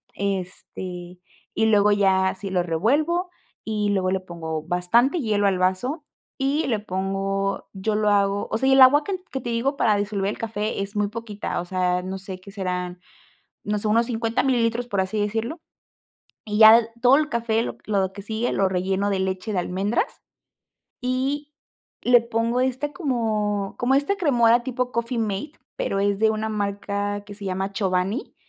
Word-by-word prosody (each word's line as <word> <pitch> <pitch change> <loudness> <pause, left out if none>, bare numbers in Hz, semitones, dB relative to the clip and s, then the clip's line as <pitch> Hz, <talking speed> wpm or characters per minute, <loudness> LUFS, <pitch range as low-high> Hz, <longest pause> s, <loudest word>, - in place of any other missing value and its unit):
este 180 -2 -5 0.4
y 220 - +2
luego 210 -1 +4
ya 190 -2 +3
así 195 +1 -6
lo 180 -2 +1
revuelvo, 295 - +1 0.3
y 210 -2 -1
luego 190 -2 +1
le 190 - +1
pongo 160 -4 -5
bastante 180 - +2
hielo 210 -6 +1
al 190 -2 +1
vaso 220 - 0 0.4
y 275 +4 +1
le 220 -4 0
pongo 195 0 -2
yo 195 +3 -2
lo 210 0 +2
hago, 200 0 +2
o - - +1
sea, 265 +4 0
y 265 - +5
el 265 - +6
agua 285 +3 +7
can 380 +3 -2
que 265 - -3
te 240 - -5
digo 265 +5 0
para 215 -6 +3
disolver 200 -1 -1
el - - -7
café 215 -2 -2
es 200 +2 -5
muy 205 0 +1
poquita, 215 -4 -4
o - - -7
sea, 180 0 0
no 190 +1 -5
sé, 190 -1 -8
¿qué 200 - -12
serán?, 180 -2 -3 0.7
no 210 0 -1
sé, 210 - -2
unos 230 +2 +3
50 230 -1 0
mililitros, 240 -2 +1
por 200 -5 -1
así 190 +3 -1
decirlo. 225 +8 -2 0.9
Y 210 -1 -2
ya 220 +1 +10
l 230 -1 -1
todo 255 +1 +6
el 305 0 0
café, 230 -3 0
lo - - -5
lo 195 -3 0
que 200 - -8
sigue, 220 +4 -2
lo 195 -1 +2
relleno 190 +2 0
de 195 -1 0
leche 190 +3 -2
de 185 - +1
almendras 195 - -1 0.8
y 270 +4 -2 0.5
le 245 0 +6
pongo 230 +1 -1
este 260 +3 -1
como 215 - -1
como 255 +2 +2
esta 285 +9 +1
cremora 240 - +4
tipo 250 0 -2
coffee 235 +1 -2
mate, 215 +7 -3 0.2
pero 195 - -1
es 200 0 +1
de 220 0 +4
una 220 0 -2
marca 205 0 -2
que 205 - -9
se 200 - -8
llama 190 +1 -2
Chobani, 190 +4 -1
210 Hz, 185 wpm, -24 LUFS, 195-235 Hz, 0.9 s, ya